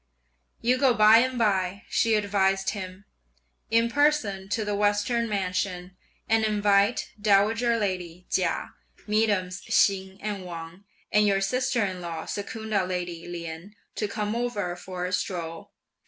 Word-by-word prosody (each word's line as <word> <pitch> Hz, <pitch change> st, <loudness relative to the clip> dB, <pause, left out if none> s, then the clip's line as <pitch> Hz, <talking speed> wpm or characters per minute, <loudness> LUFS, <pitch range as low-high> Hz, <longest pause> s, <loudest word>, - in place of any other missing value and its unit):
"You 250 Hz, +2 st, +2 dB
go 260 Hz, -3 st, +4 dB
by 215 Hz, +1 st, +7 dB
and 255 Hz, +1 st, 0 dB
by," 195 Hz, -4 st, 0 dB
(she 225 Hz, -1 st, +2 dB
advised 195 Hz, -2 st, +1 dB
him), 190 Hz, -1 st, -7 dB, 0.6 s
"in 230 Hz, +1 st, +3 dB
person 235 Hz, -8 st, +1 dB
to 215 Hz, +1 st, -1 dB
the 205 Hz, -, -1 dB
Western 210 Hz, +3 st, +1 dB
Mansion 185 Hz, -2 st, -2 dB, 0.3 s
and 225 Hz, 0 st, +3 dB
invite 205 Hz, +1 st, +2 dB
dowager 220 Hz, +3 st, +3 dB
lady 180 Hz, -4 st, -3 dB
Chia, -, -, 0 dB, 0.3 s
mesdames 205 Hz, -4 st, 0 dB
Hsing 190 Hz, -1 st, +2 dB
and 205 Hz, -2 st, -4 dB
Wang, 170 Hz, +2 st, -9 dB, 0.3 s
and 210 Hz, 0 st, +4 dB
your 195 Hz, -1 st, +3 dB
sister 250 Hz, +3 st, 0 dB
in 185 Hz, -2 st, -4 dB
law 165 Hz, -2 st, -5 dB
Secunda 210 Hz, -1 st, -2 dB
lady 175 Hz, -2 st, -4 dB
Lien 170 Hz, +3 st, -7 dB, 0.2 s
to 210 Hz, -, -2 dB
come 210 Hz, +1 st, -3 dB
over 210 Hz, -7 st, -2 dB
for 180 Hz, 0 st, -6 dB
a 180 Hz, -, -4 dB
stroll. 165 Hz, -3 st, -3 dB
200 Hz, 140 wpm, -26 LUFS, 185-220 Hz, 0.6 s, by